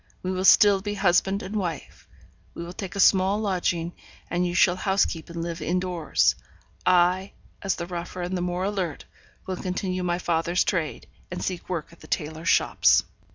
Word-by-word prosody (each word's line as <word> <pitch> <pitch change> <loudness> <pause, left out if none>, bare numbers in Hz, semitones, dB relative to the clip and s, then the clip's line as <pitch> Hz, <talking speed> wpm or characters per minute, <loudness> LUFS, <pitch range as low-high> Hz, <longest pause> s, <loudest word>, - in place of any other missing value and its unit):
We 185 - -1
will 185 0 -1
still 200 -1 +7
be 205 +1 -3
husband 195 +1 +2
and 200 +3 -6
wife; 175 -7 -4 0.5
we 170 - -5
will 175 - -8
take 190 0 -7
a - - -4
small 195 +1 +4
lodging, 175 -4 -1 0.4
and 180 +1 +1
you 175 - -3
shall 180 -1 +4
house 195 0 +2
keep 165 -1 -6
and 170 0 -5
live 170 0 -5
in 180 +2 0
doors. 180 -3 +1 0.5
I, 185 +2 +3 0.3
as 195 - 0
the 170 - -5
rougher 175 0 -5
and 180 +2 -3
the 180 - -2
more 180 +1 -2
alert, 190 -6 -3 0.4
will 185 -1 -4
continue 185 0 -3
my 175 -1 0
father's 175 0 +1
trade, 170 -6 -2 0.2
and 180 - -5
seek 185 -2 -4
work 170 -2 -4
at 170 - -18
the - - -14
tailors' 160 +1 -2
shops.' - - +4
180 Hz, 190 wpm, -25 LUFS, 175-190 Hz, 0.5 s, still